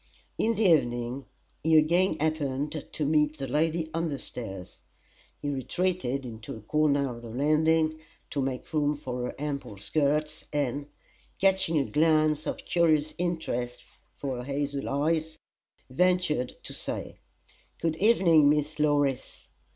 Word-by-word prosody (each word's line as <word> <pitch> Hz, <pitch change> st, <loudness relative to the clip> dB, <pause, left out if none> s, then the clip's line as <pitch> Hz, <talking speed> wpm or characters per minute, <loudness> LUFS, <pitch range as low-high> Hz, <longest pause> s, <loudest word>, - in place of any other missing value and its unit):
In 230 Hz, +1 st, +2 dB
the 220 Hz, -, +1 dB
evening 125 Hz, -, +2 dB, 0.3 s
he 160 Hz, 0 st, +4 dB
again 170 Hz, +2 st, +3 dB
happened 150 Hz, -1 st, -2 dB
to 150 Hz, -, -2 dB
meet 150 Hz, +1 st, +2 dB
the 135 Hz, -, -3 dB
lady 160 Hz, +4 st, 0 dB
on 165 Hz, +1 st, 0 dB
the 145 Hz, -3 st, -3 dB
stairs. 95 Hz, -9 st, -8 dB, 0.6 s
He -, -, -5 dB
retreated 140 Hz, -1 st, -1 dB
into 115 Hz, -1 st, -7 dB
a 110 Hz, -, -10 dB
corner 140 Hz, 0 st, +1 dB
of 120 Hz, -, -10 dB
the 120 Hz, -, -9 dB
landing, 155 Hz, +5 st, +2 dB, 0.3 s
to 140 Hz, -, -1 dB
make 130 Hz, +3 st, -4 dB
room 150 Hz, -1 st, +2 dB
for 125 Hz, -3 st, -4 dB
her -, -, -5 dB
ample 140 Hz, -7 st, -4 dB
skirts, 150 Hz, +7 st, 0 dB
and, 145 Hz, -1 st, -1 dB, 0.5 s
catching 190 Hz, -4 st, +3 dB
a 140 Hz, -, +2 dB
glance 155 Hz, 0 st, +2 dB
of -, -, -4 dB
curious 155 Hz, -3 st, +2 dB
interest 125 Hz, -9 st, -2 dB, 0.3 s
for 135 Hz, -3 st, -4 dB
her 125 Hz, -, -5 dB
hazel 140 Hz, +1 st, -2 dB
eyes, 155 Hz, +3 st, 0 dB, 0.5 s
ventured 165 Hz, -3 st, +1 dB
to -, -, -6 dB
say: -, -, -4 dB, 0.6 s
"Good 165 Hz, -1 st, 0 dB
evening, 170 Hz, -8 st, +5 dB
Miss 150 Hz, +1 st, 0 dB
Law 150 Hz, -1 st, +3 dB
ris!" 135 Hz, -3 st, -3 dB
150 Hz, 145 wpm, -28 LUFS, 135-160 Hz, 0.6 s, evening